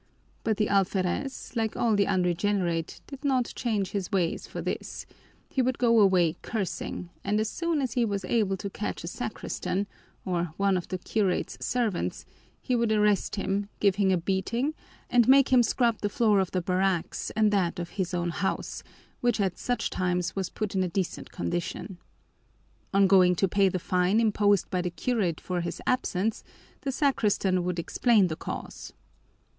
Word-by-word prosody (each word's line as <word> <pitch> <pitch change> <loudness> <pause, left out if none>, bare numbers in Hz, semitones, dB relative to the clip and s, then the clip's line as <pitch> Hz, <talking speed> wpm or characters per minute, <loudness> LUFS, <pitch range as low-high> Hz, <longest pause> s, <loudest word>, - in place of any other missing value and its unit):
But 220 -2 0
the 210 - +2
alferez, 195 +7 -1
like 225 -2 -1
all 230 -3 +2
the 200 -1 +2
unregenerate, 180 -2 0
did 275 0 -10
not 260 -4 +1
change 210 -6 -1
his 200 -2 -3
ways 180 -4 0
for - - -7
this; - - -4 0.4
he 265 - 0
would 255 0 0
go 230 -2 +4
away 180 -5 +4
cursing, 190 -4 -4
and 205 +2 +1
as 215 0 -1
soon 335 -4 -1
as 250 -4 -2
he 245 - +2
was 200 -4 -1
able 195 -2 +1
to 200 +1 -5
catch 210 - -4
a - - -5
sacristan, 200 -3 -3 0.4
or 175 -3 -2
one 195 -1 +2
of 180 - -2
the 185 - -3
curate's 190 0 -1
servants, 235 -7 -1 0.3
he 255 - -1
would 235 -2 +1
arrest 210 -2 +2
him, 200 0 -1
give 200 -2 +3
him 200 -2 +3
a 185 - +3
beating, 200 - -1 0.3
and 240 -2 +4
make 270 +1 +6
him 250 - +7
scrub 235 -1 +1
the 205 - 0
floor 210 -1 +3
of 190 -2 0
the 185 -2 -2
barracks 185 -1 0
and 215 -1 +3
that 190 -4 +1
of 175 -1 -4
his 185 -3 -2
own 175 -1 -1
house, 190 +3 -2 0.4
which 240 -2 +1
at 190 -3 0
such 245 0 -1
times 180 -1 -1
was 190 -2 -2
put 215 -2 -4
in 190 - +1
a 185 - +1
decent 185 +1 -3
condition. 175 +2 -4 0.9
On 195 0 +5
going 185 -2 +5
to 195 - +2
pay 195 +1 +3
the 185 - -1
fine 180 +4 +2
imposed 205 -3 +3
by 180 -2 +1
the 180 - -2
curate 180 -2 -1
for 180 -1 -2
his 170 0 -4
absence, 225 -4 0 0.4
the 275 - -2
sacristan 210 - +1
would 180 0 -2
explain 200 +3 +3
the 155 - -3
cause. - - -7
200 Hz, 180 wpm, -27 LUFS, 180-225 Hz, 0.9 s, him